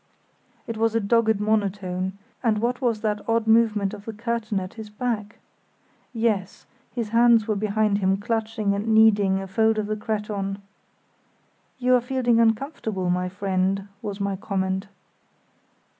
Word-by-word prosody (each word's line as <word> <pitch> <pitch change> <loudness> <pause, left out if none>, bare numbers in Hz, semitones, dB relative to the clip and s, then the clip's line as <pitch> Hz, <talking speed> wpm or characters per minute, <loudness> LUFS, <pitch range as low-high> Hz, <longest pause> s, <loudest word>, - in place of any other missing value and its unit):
It 230 - -5
was 225 0 +1
a - - +4
dogged 220 0 +2
monotone, 195 -3 -1 0.3
and 225 -4 +2
what 245 +4 -1
was 230 -4 0
that 210 -1 -1
odd 225 0 +2
movement 220 -3 +3
of 205 -1 -9
the 225 - -5
curtain 225 -2 -2
at 185 0 -7
his 220 -2 -9
back? 215 -1 -3 0.7
Yes, 220 -5 -1 0.3
his 235 -3 -3
hands 230 -1 +4
were 215 - +1
behind 210 0 +1
him 190 0 +2
clutching 220 -1 -1
and 200 +2 -3
kneading 205 -3 +5
a 195 - -5
fold 220 +3 +2
of 215 - 0
the 215 +1 -2
cretonne. 210 -2 -3 1.2
"You 255 0 +2
are 250 - +5
feeling 245 -2 +1
uncomfortable, 225 - 0
my 180 0 0
friend," 195 +1 -1
was 205 -1 -5
my 200 -1 -1
comment. 190 0 -2
215 Hz, 150 wpm, -24 LUFS, 200-225 Hz, 1.2 s, kneading